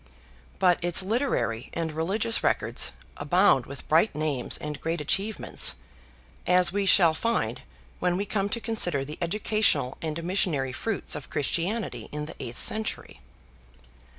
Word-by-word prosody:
But 180 -2 +2
its 175 +1 +2
literary 205 - -1
and 165 -1 -2
religious 195 +9 0
record - - 0 0.4
abounds - - +3
with - - -10
bright 215 - +3
names 150 -5 -1
and 150 -1 -6
great 165 +1 -2
achievements, 195 +8 +1 0.7
as 180 -1 +4
we 200 -1 0
shall 170 -4 +6
find 230 +8 -1 0.4
when 180 0 0
we 200 - -2
come 200 -1 -1
to 235 - -2
consider 180 - +1
the 150 +2 -8
educational 205 - +1
and 160 +1 -4
missionary 165 -8 0
fruits 220 +8 -2
of 150 - -6
Christianity 175 - -2
in 150 0 -4
the 155 - -9
eighth 120 -2 -6
century. 220 - 0
175 Hz, 140 wpm, -26 LUFS, 150-205 Hz, 0.7 s, shall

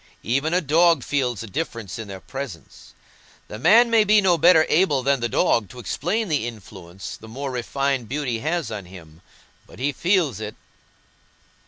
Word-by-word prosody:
Even 140 +7 0
a 180 +1 +2
dog 165 -1 +3
feels 125 -6 -1
a - - -6
difference 115 - -5
in 110 - -6
their 95 -1 -8
presence. 130 - -9 0.5
The 105 - -7
man 230 - +5
may 225 -2 +5
be 210 +1 +5
no 190 -3 +3
better 165 0 +5
able 150 -6 +2
than 140 0 +2
the 120 0 -2
dog 105 -4 +1
to - - -13
explain 180 - -2
the 145 -8 -1
influence 95 -5 -9
the 110 - -13
more 135 +4 -5
refined 130 0 -2
beauty 130 -4 -2
has 155 -2 -2
on 105 -3 -6
him, 85 -3 -14 0.5
but - - -15
he 135 +5 -1
feels 170 - +1
it." 110 -1 -6
135 Hz, 175 wpm, -23 LUFS, 110-165 Hz, 0.5 s, man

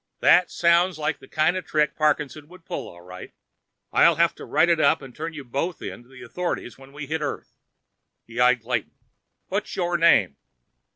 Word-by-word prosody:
"That 180 - +5
sounds 170 0 +2
like 150 - -2
the - - -15
kind 155 +3 +1
of 185 - -3
trick 150 -1 0
Parkinson 150 -1 -1
would 180 +1 -17
pull, - - -5
all 85 - -14
right. 90 +1 -11 0.6
I'll 170 - +5
have 170 +1 +2
to - - -11
write 160 - +2
it 170 -2 +3
up 160 - +3
and 130 -3 -12
turn 160 +2 -5
you 150 -2 -8
both 140 +8 -3
in - - -7
to 120 - -22
the 130 -1 -13
authorities 175 -8 -4
when 135 0 -16
we 145 +1 -7
hit 160 +3 -3
Earth." - - -5 0.7
He 115 +1 -8
eyed 125 -1 +4
Clayton. 115 -3 -3 0.6
"What's - - -3
your 175 -2 -1
name?" 110 - +4
150 Hz, 195 wpm, -24 LUFS, 125-170 Hz, 0.7 s, That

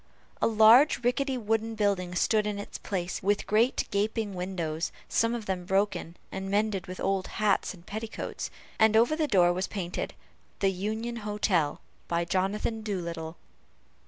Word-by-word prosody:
A - - +4
large 230 +5 +6
rickety 260 +2 +1
wooden 225 0 -1
building 195 -4 0
stood 210 +4 +2
in 210 -1 -2
its 205 - -7
place, 180 -3 -3
with 200 +1 +1
great 225 +5 +2
gaping 210 +1 0
windows, 175 -3 -3 0.2
some 230 +1 +1
of 230 -3 -5
them 185 -2 -2
broken, 190 -2 0
and 190 0 -4
mended 205 -2 0
with 185 0 -7
old 195 -1 0
hats 205 -2 +1
and 170 -1 -18
petticoats, 220 +3 -5 0.3
and 220 0 +5
over 240 +7 +4
the 310 -1 0
door 175 -7 +4
was 185 +2 -2
painted, 180 -4 -4 0.4
"The 195 -1 +2
Union 220 +5 -3
Hotel, 205 -7 0 0.3
by 170 0 0
Jonathan 195 +5 -1
Doolittle." 170 -6 -4
205 Hz, 155 wpm, -28 LUFS, 185-220 Hz, 0.4 s, large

